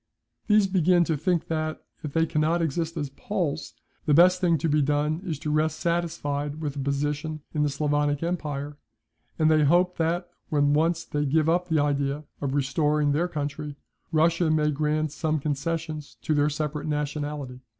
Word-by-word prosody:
These 210 -1 +5
begin 180 -2 +3
to 160 -1 0
think 165 +3 0
that, 155 -1 -3 0.2
if 150 - -4
they 165 0 +3
cannot 155 +2 +1
exist 165 +1 -1
as 145 -3 -3
Poles, 165 -2 -3 0.3
the 150 - +5
best 180 +3 +6
thing 170 -3 +3
to 160 - -1
be 150 -1 +3
done 150 +3 0
is 165 -6 -3
to 150 +1 -3
rest 155 +1 +1
satisfied 155 -4 -1
with 150 -3 -3
a - - -4
position 145 +2 -2
in 150 - 0
the 150 - +2
Sclavonic 145 +1 0
empire, 150 -4 -3 0.6
and 155 -1 +4
they 155 -1 +4
hope 175 +5 +3
that, 170 +2 0 0.2
when 145 -1 +3
once 165 +2 +1
they 145 0 -1
give 155 +2 +2
up 175 +2 +2
the 160 -2 +1
idea 145 0 0 0.2
of 140 -1 -1
restoring 145 +1 +1
their 160 +5 +1
country, 145 -2 -4 0.4
Russia 165 +1 +3
may 155 -1 +2
grant 150 +1 0
some 155 0 -1
concessions 155 +1 -3
to 155 - +1
their 145 0 +3
separate 150 0 -3
nationality. 145 -3 -3
155 Hz, 175 wpm, -26 LUFS, 145-165 Hz, 0.6 s, best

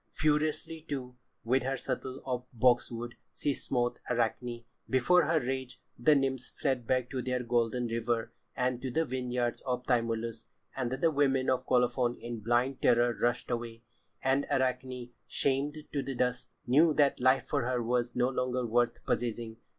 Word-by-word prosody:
Furiously, 155 +1 0
too, 125 -3 -4 0.3
with 130 +3 +2
her 135 +1 -1
shuttle 130 +1 -4
of 125 -1 -3
boxwood 120 0 +2 0.2
she 145 - 0
smote 120 -2 -1
Arachne. 120 0 -1 0.3
Before 135 +8 +4
her 160 -1 +3
rage, 130 -1 -4 0.2
the 150 +6 +4
nymphs 135 -2 0
fled 130 -5 -1
back 130 -1 +1
to 130 - -2
their 125 0 -1
golden 120 0 +1
river 115 0 -1 0.2
and 125 -1 0
to 130 - -3
the 160 +6 +1
vineyards 125 -2 -2
of 125 -1 -2
Tymolus, 115 -2 -1 0.3
and 125 -3 -1
the 150 +5 +2
women 135 -3 +2
of 130 - -1
Colophon 125 -1 +2
in 120 -1 -5
blind 120 +4 +1
terror 120 0 +4
rushed 120 +1 0
away. 115 -1 -4 0.4
And 135 +2 +2
Arachne, 130 -1 -1 0.2
shamed 140 +2 0 0.2
to 140 - 0
the 135 -1 -4
dust, 125 0 -1
knew 150 +5 +5
that 145 -2 +3
life 130 +1 +4
for - - 0
her 125 -2 0
was 120 +1 0
no 125 +1 +2
longer 125 -1 -1
worth 120 +1 +1
possessing. 115 -1 -2
125 Hz, 160 wpm, -31 LUFS, 120-130 Hz, 0.4 s, knew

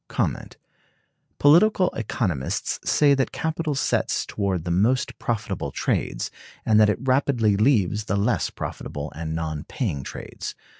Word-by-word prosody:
"Political 180 +5 +5
economists 95 - -2
say 145 -1 +4
that 135 -1 0
capital 160 -2 -2
sets 135 - 0
toward 95 -5 -2
the 85 - -1
most 115 +9 +1
profitable 105 -9 -2
trades, - - -2 0.3
and 110 -1 +4
that 105 -1 +6
it 105 - +1
rapidly 130 -5 +2
leaves 105 -3 +2
the 100 - 0
less 110 +4 +1
profitable 75 +1 -6
and 80 0 -4
non 80 -2 -3
paying 90 - -3
trades. - - -7
110 Hz, 130 wpm, -24 LUFS, 90-135 Hz, 0.3 s, that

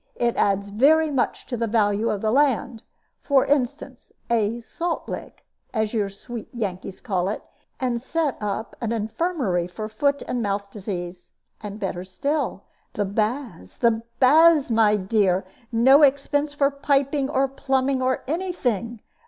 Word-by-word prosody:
It 235 -1 0
adds 200 0 +1
very 300 +9 +4
much 260 -4 -1
to 250 - -4
the 230 -1 -1
value 210 0 +1
of 205 - -2
the 215 - +1
land. 255 -4 +1 0.4
For 275 -2 +3
instance, 275 -1 -2 0.2
a 230 0 +1
'salt 335 +8 -4
lick,' - - -8 0.3
as 220 0 0
your 210 -3 0
sweet 215 +3 -8
Yankees 195 -4 -5
call 190 -5 -1
it 210 - -4 0.4
and 245 -2 -1
set 305 +1 -1
up 210 +2 -3
an 230 -2 -1
infirmary 220 - -1
for 215 +4 -6
foot 280 +6 0
and 245 - -1
mouth 200 -1 -2
disease. 180 -3 -6 0.3
And 210 0 -7
better 185 -3 -3
still, 280 +11 -2 0.3
the 205 - -1
baths, 215 - -3
the 230 -1 +2 0.2
baths, 300 +1 +6
my 220 -2 +4
dear. 190 -2 +1 0.3
No 260 +5 +6
expense 285 +1 +2
for 280 -1 +2
piping, 280 0 +1
or 270 -1 +2
pumping, 265 0 0
or 255 0 0
any 360 +6 -1
thing. 235 - -2
235 Hz, 155 wpm, -24 LUFS, 205-275 Hz, 0.4 s, baths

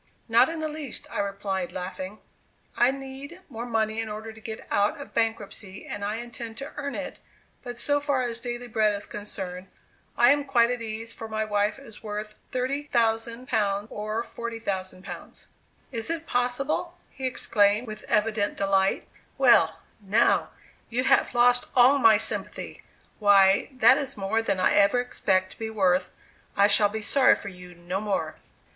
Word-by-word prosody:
"Not 235 +4 +5
in 325 -1 -4
the 310 - -1
least," 300 -4 -5
I - - -3
replied, 195 -2 -2
laughing; 185 +3 -6 0.5
"I 240 - +4
need 270 +5 -7
more 235 +2 -6
money 220 -1 0
in 225 -1 -3
order 220 +1 -6
to 220 - -14
get 220 0 -7
out 205 +10 +2
of 285 - -10
bankruptcy 225 -3 -3
and 205 -1 -6
I 205 +1 -1
intend 235 -1 -7
to 275 +3 -6
earn 280 -1 -4
it; - - -6 0.4
but 245 -1 -7
so 290 +4 +1
far 285 -3 0
as 235 -1 -2
daily 240 0 -5
bread 215 -2 +2
is 200 - -6
concerned, 190 -3 -6 0.5
I 240 +2 +7
am 290 0 +2
quite 245 -4 +3
at 245 -1 -3
ease, 225 +1 -5
for 225 - -7
my 220 0 -2
wife 205 +1 0
is 270 -6 -13
worth 210 0 -5 0.2
£30,000 230 -5 0
or 215 +2 -3
£40,000." 200 -6 -6 0.5
"Is 230 0 -2
it 330 -1 -2
possible?" 275 +9 -1
he 265 -1 -3
exclaimed, 210 -2 +2
with 215 -2 -8
evident 210 -1 +1
delight; 195 -1 +1 0.3
"well, - - +5 0.2
now, 210 +4 +3 0.4
you 245 +2 0
have 255 - +3
lost 245 +1 +4
all 260 +3 +6
my 225 -4 +7
sympathy; 220 - -4 0.4
why, 200 -2 +5
that 255 +1 +5
is 270 -4 -1
more 205 +3 0
than 200 -4 -1
I 185 - +3
ever 200 +4 +4
expect 190 -6 0
to - - -15
be 225 -1 -3
worth; 185 -4 +2 0.5
I 200 - +6
shall 205 0 +4
be 220 +1 -5
sorry 270 +4 +5
for 200 - -7
you 180 -1 -12
no 175 +3 -4
more." 205 -2 -2
225 Hz, 165 wpm, -26 LUFS, 205-245 Hz, 0.5 s, I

